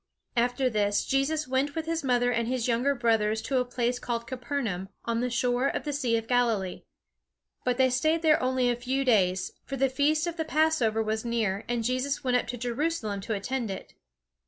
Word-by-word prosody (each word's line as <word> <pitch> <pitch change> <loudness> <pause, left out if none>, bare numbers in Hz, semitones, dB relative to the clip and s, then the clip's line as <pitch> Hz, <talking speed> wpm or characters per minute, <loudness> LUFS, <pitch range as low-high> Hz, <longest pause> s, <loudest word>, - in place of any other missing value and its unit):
After 245 +2 +2
this 205 -3 +1
Jesus 285 +3 0
went 270 +3 0
with 320 -1 -2
his 330 -1 -2
mother 245 -2 +2
and 235 -1 0
his 250 -1 -1
younger 250 +4 +2
brothers 220 -3 +2
to 265 -2 +1
a 250 - 0
place 245 0 -1
called 235 -1 -3
Capernaum, 240 -7 -3 0.2
on 230 0 0
the 250 - 0
shore 245 +2 +1
of - - -2
the 295 - -3
Sea 250 -5 +1
of 225 - -4
Galilee. 230 -7 +1 0.8
But 250 -1 0
they 260 -1 +4
stayed 315 +6 +1
there 310 -1 +4
only 255 0 +1
a 240 - +2
few 260 +3 -1
days, 190 -6 +2
for 275 - -5
the 270 +1 +2
feast 295 +4 +2
of 345 -1 -4
the 320 - 0
Passover 305 -8 +2
was 220 0 -2
near, 225 -4 -1
and 240 -1 0
Jesus 255 +4 -1
went 250 -1 +1
up 250 - +1
to 245 - -4
Jerusalem 240 -4 -2
to 220 +2 -2
attend 240 +3 -2
it. 190 - -7
245 Hz, 205 wpm, -28 LUFS, 230-270 Hz, 0.8 s, they